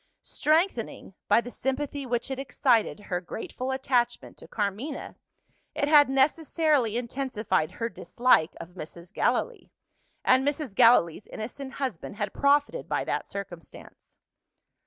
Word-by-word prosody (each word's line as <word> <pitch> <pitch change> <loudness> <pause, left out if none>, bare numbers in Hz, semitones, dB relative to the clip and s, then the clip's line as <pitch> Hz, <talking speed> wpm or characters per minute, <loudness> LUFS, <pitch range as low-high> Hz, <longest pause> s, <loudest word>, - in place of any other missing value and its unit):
Strengthening, 310 - 0
by 230 - +5
the 245 - -8
sympathy 275 +2 -3
which 240 +2 -2
it 265 - -3
excited, 250 -5 +1
her 180 -3 -3
grateful 235 +7 -6
attachment 255 -2 0
to - - -11
Carmina, 215 +8 -3 0.6
it 285 - 0
had 295 -2 +7
necessarily 280 -3 +2
intensified 235 - -1
her 230 - -2
dislike 215 -4 +2
of 165 - -9
Mrs. 170 +1 -10
Gallilee - - 0 0.6
and 260 +1 +5
Mrs. 290 -4 -2
Gallilee's 195 -4 +4
innocent 265 +5 -7
husband 255 - -4
had 205 -2 -3
profited 285 +11 +2
by - - 0
that - - -2
circumstance! 175 -6 -10
250 Hz, 125 wpm, -27 LUFS, 205-280 Hz, 0.6 s, had